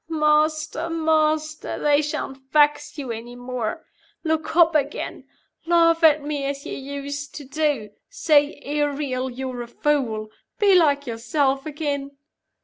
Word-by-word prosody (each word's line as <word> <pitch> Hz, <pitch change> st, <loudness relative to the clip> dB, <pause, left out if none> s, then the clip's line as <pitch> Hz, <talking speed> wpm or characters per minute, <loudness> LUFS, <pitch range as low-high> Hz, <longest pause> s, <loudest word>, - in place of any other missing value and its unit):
"Master! 310 Hz, +1 st, +1 dB
master! 310 Hz, -1 st, 0 dB
They 290 Hz, 0 st, +3 dB
shan't 285 Hz, -2 st, -4 dB
vex 295 Hz, 0 st, +3 dB
you 270 Hz, -5 st, -4 dB
any 230 Hz, +2 st, -7 dB
more. 245 Hz, +2 st, -4 dB, 0.4 s
Look 320 Hz, -1 st, -1 dB
up 335 Hz, -1 st, +6 dB
again. 290 Hz, -1 st, -2 dB, 0.4 s
Laugh 335 Hz, -1 st, +4 dB
at 305 Hz, -2 st, +6 dB
me 290 Hz, -1 st, -3 dB
as 280 Hz, 0 st, -4 dB
you -, -, -5 dB
used 280 Hz, +1 st, -6 dB
to 295 Hz, -, -7 dB
do. 280 Hz, -6 st, -1 dB, 0.2 s
Say, 300 Hz, -11 st, +2 dB
'Ariel, 285 Hz, -3 st, -1 dB
you're 255 Hz, 0 st, -5 dB
a 240 Hz, -, -6 dB
fool.' 235 Hz, -6 st, -1 dB, 0.3 s
Be 405 Hz, -2 st, +4 dB
like 290 Hz, -5 st, +4 dB
yourself 265 Hz, +4 st, 0 dB
again!" 285 Hz, -2 st, -4 dB
290 Hz, 135 wpm, -23 LUFS, 270-310 Hz, 0.4 s, up